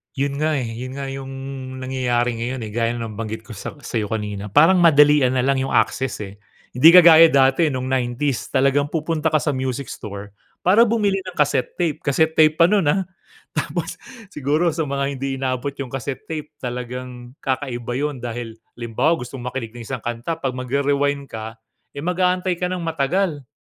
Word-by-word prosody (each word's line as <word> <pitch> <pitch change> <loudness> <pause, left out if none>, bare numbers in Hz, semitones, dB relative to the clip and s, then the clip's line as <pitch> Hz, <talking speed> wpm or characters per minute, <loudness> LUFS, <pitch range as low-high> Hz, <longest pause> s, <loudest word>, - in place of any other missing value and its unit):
Yun 140 +1 -2
nga, 155 0 +1
eh, 135 - -1
yun 120 +3 -6
nga 135 -1 -5
yung 135 0 -6 0.5
nangyayari 125 -2 -1
ngayon, 120 +1 -3
eh. 110 - -6
Gaya 115 +1 0
ng 115 - -4
nabanggit 110 0 -5
ko 110 - -13
sak 110 +7 -8
sayo 110 -4 -2
kanina. 105 -2 -4
Parang, 160 - +5
madalian 150 -5 +5
nalang 130 +1 +2
yung - - -2
access, 130 -5 0
eh. 100 0 -10 0.3
Hindi 160 +8 +7
kagaya 165 -2 +9
dati 135 +2 +3
nung 130 -2 -3
90's, 130 +1 -1
talagang 140 +1 +2
pupunta 160 0 -1
ka 155 - +1
sa 150 - +1
music 130 -1 -3
store 100 -1 -8 0.3
para 220 +6 +5
bumili 205 -3 +1
ng 185 -2 -9
cassette 145 -3 0
tape. 170 -5 -1
Casette 160 +3 +1
tape 155 -1 +4
pa 165 - +5
nun, 190 -2 +3
ah. 190 +6 +2 0.5
Tapos, - - -3 0.3
siguro 150 0 0
sa 160 - -1
mga 140 -1 -2
hindi 135 0 -3
inabot 130 +1 -2
yung 135 -2 -4
cassette 135 +1 -5
tape. 155 -2 -5
Talagang 125 +1 -7
kakaiba 125 -3 -3
yun. 145 +1 -2
Dahil 120 -1 -6 0.2
halimbawa, 120 +7 0
gustong 125 +1 -8
makinig 125 -3 -4
ng 115 - -8
isang 130 -2 -5
kanta, 120 +7 -3
'pag 135 - 0
magre-rewind 140 +2 0
ka, 110 0 -6 0.4
eh, 140 - -6
mag-aantay 180 +1 0
ka 180 - -1
ng 180 -1 -3
matagal. 160 -1 -1
135 Hz, 180 wpm, -21 LUFS, 120-155 Hz, 0.5 s, kagaya